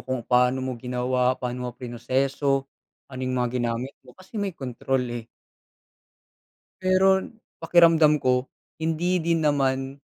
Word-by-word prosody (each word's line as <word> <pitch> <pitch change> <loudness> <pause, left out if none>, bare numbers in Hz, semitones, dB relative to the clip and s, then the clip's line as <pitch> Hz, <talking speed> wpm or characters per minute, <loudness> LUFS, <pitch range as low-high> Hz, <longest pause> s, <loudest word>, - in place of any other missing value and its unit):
kung 130 -3 -4
paano 125 +1 +2
mo 130 - -2
ginawa, 125 0 0
paano 125 0 -4
mo - - -4
prinoseso, 135 +3 -1 0.5
ano 130 - -6
yung 130 0 -2
mga 125 -1 0
ginamit 120 +3 -2
mo - - -18
kasi 190 +3 -7
may 195 -2 -2
kontrol 130 0 -2
eh. 120 -1 -6 1.5
Pero 190 +1 +3 0.3
pakiramdam 165 -3 +5
ko, 125 0 +2 0.3
hindi 165 +3 0
din 165 -1 0
naman 135 -2 0
130 Hz, 130 wpm, -25 LUFS, 125-160 Hz, 1.5 s, pakiramdam